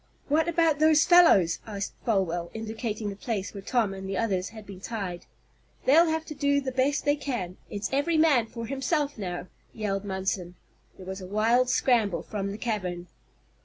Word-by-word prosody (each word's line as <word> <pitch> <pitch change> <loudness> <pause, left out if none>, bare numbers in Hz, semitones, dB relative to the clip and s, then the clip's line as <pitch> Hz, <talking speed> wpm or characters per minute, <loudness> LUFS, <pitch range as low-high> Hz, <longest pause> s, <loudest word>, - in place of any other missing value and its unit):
"What 315 +3 +3
about 330 -3 +2
those 310 -1 +5
fellows?" 205 - +6
asked 205 -2 -4
Folwell, 175 -6 0
indicating 220 -1 -4
the - - -7
place 205 -1 -4
where 200 - -7
Tom 220 -1 0
and 190 0 -7
the 195 - -2
others 190 -4 0
had 220 -1 -11
been 190 -1 -10
tied. 195 -6 -5 0.6
"They'll 325 +6 +6
have 320 0 -1
to 305 - -7
do 285 -1 +2
the 270 -2 -3
best 265 +4 +1
they 290 0 +3
can! 240 -11 -4
It's 205 0 -3
every 315 +4 +2
man 290 -8 +4
for 230 0 -6
himself, 280 +3 -1
now!" 180 -3 -4 0.3
yelled 200 -3 -2
Munson. 190 -2 -3 0.4
There 185 - -11
was 190 +1 -6
a 185 - -7
wild 230 +5 +2
scramble 235 -7 +2
from 200 -2 -4
the 205 - -6
cavern. 180 -7 -3
220 Hz, 180 wpm, -27 LUFS, 195-280 Hz, 0.6 s, fellows